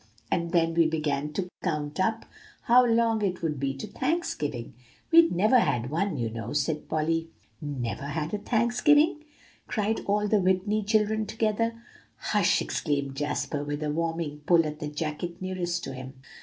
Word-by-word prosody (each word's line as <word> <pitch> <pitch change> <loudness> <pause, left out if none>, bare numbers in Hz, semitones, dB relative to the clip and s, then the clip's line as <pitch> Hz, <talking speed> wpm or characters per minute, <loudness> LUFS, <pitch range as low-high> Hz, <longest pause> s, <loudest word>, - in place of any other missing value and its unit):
"And 170 -1 0
then 165 -2 +2
we 165 -1 +4
began 150 -2 -1
to 180 +3 -2 0.2
count 150 -3 -2
up 225 +4 0 0.4
how 250 +1 +6
long 230 -2 +2
it 180 -3 -1
would 150 -4 -1
be 135 0 -1
to 135 - -6
Thanksgiving. 150 - -2 0.4
We'd 335 0 +7
never 215 +8 +4
had 125 - 0
one, 175 +1 0
you 115 -2 -2
know," 115 0 -5
said 150 +1 -1
Polly. 165 +1 0 0.3
"Never 140 -2 -4
had 150 +3 -3
a 210 - -1
Thanksgiving!" 290 - +3 0.4
cried 215 0 0
all 210 +1 +2
the 210 0 +3
Whitney 190 +3 +1
children 215 0 +1
together. 225 +1 0 0.4
"Hush!" - - +2
exclaimed 140 -3 -2
Jasper, 145 0 -2
with 145 +1 -3
a 150 - -1
warning 165 -1 -2
pull 170 -2 +5
at 150 0 -5
the 150 - -4
jacket 155 +3 -4
nearest 175 -2 -2
to 135 - -5
him. 130 +1 -8
170 Hz, 165 wpm, -27 LUFS, 150-215 Hz, 0.4 s, We'd